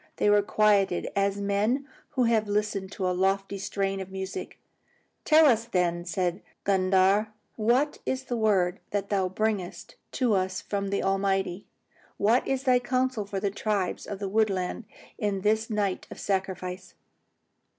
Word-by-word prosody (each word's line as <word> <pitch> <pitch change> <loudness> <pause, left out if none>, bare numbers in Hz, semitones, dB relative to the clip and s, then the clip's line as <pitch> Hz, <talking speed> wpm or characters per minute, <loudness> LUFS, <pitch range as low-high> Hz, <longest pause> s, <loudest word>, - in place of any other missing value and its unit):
They 210 - +3
were 205 0 +5
quieted 205 -3 +2
as 200 0 +1
men 210 +8 0 0.3
who 255 - +2
have 225 -2 +2
listened 205 -2 -1
to 185 - -2
a 180 - +1
lofty 195 +2 0
strain 195 0 -2
of 190 -1 -6
music. 190 0 -6 0.7
"Tell 315 0 +6
us, 230 -5 +4
then," 175 -5 0
said 180 +1 -1 0.2
Gundhar, 190 +2 +3 0.3
"what 245 +7 +1
is 260 0 -2
the 250 -2 -3
word 195 -5 +2
that 200 -1 -2
thou 190 -2 +1
bringest 205 -2 -2 0.2
to 245 -4 +2
us 185 -1 0
from 200 -1 -3
the 200 - -1
Almighty. 195 -1 0 0.5
What 225 +5 +3
is 270 -1 -1
thy 255 -2 +4
counsel 255 -3 -1
for 200 -1 -3
the 200 0 -1
tribes 200 -2 -2
of 205 - -4
the 200 0 -4
woodland 200 0 0 0.4
on 200 -2 0
this 220 +2 +1
night 205 -3 -1
of - - -9
sacrifice?" 185 -1 -3
200 Hz, 155 wpm, -27 LUFS, 190-220 Hz, 0.7 s, Tell